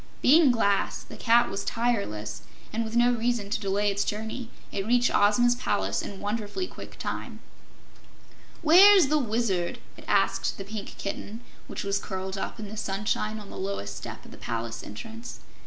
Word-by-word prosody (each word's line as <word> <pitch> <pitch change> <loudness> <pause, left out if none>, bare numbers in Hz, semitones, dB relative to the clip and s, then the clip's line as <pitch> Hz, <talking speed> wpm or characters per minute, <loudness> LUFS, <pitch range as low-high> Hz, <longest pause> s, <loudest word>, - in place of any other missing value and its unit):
Being 305 +2 +7
glass, 200 -5 +1
the - - -11
cat 235 +1 +4
was 195 0 -3
tireless, 200 - -1 0.3
and 230 +1 0
with 220 +1 -5
no 240 +1 +5
reason 230 -3 -1
to - - 0
delay 205 +1 +1
its 200 0 0
journey, 220 +3 -4 0.2
it 195 +1 -3
reached 245 +1 +3
Ozma's 225 +4 +4
palace 245 -4 -1
in 195 - -7
wonderfully 215 - -2
quick - - -11
time. - - -5 1.2
"Where's 365 0 +8
the 305 0 +3
Wizard?" 215 -8 0 0.2
it - - -13
asked - - +1
the 195 - -6
Pink 210 0 -7
Kitten, 205 +3 -5 0.3
which - - -5
was 200 0 0
curled 190 0 -4
up 195 - -4
in 210 - -5
the 215 +2 -8
sunshine 210 +2 -1
on 205 - -11
the - - -7
lowest 190 - -3
step - - -8
of - - -13
the - - -11
palace 115 0 -4
entrance. 225 - -8
215 Hz, 170 wpm, -27 LUFS, 200-240 Hz, 1.2 s, Where's